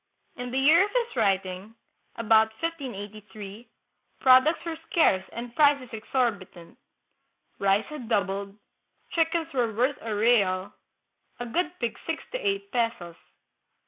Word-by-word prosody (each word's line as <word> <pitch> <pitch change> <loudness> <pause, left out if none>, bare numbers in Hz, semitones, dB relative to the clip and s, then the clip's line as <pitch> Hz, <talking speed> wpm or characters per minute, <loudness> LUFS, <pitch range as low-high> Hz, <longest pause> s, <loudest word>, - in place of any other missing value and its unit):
In 245 0 -5
the 255 - -2
year 310 +7 +6
of 410 - -2
his 475 -1 -1
writing 195 +2 -1 0.4
(about 220 -1 +4
1583), 215 -8 -7 0.5
products 260 +6 +5
were 325 -1 -4
scarce 190 - +3
and 235 0 -7
prices 285 -4 +3
exorbitant. 215 -7 -3 0.8
Rice 200 +2 +2
had 285 -7 -8
doubled, 200 -1 -1 0.5
chickens 330 -1 0
were 240 -4 +1
worth 250 +5 0
a 220 -2 -3
real, 205 -4 +2 0.7
a 245 - -4
good 340 +8 -1
pig 235 -2 -3
six 325 -1 -3
to - - -3
eight 400 -3 -2
pesos. 230 -8 -2
235 Hz, 125 wpm, -26 LUFS, 205-300 Hz, 0.8 s, year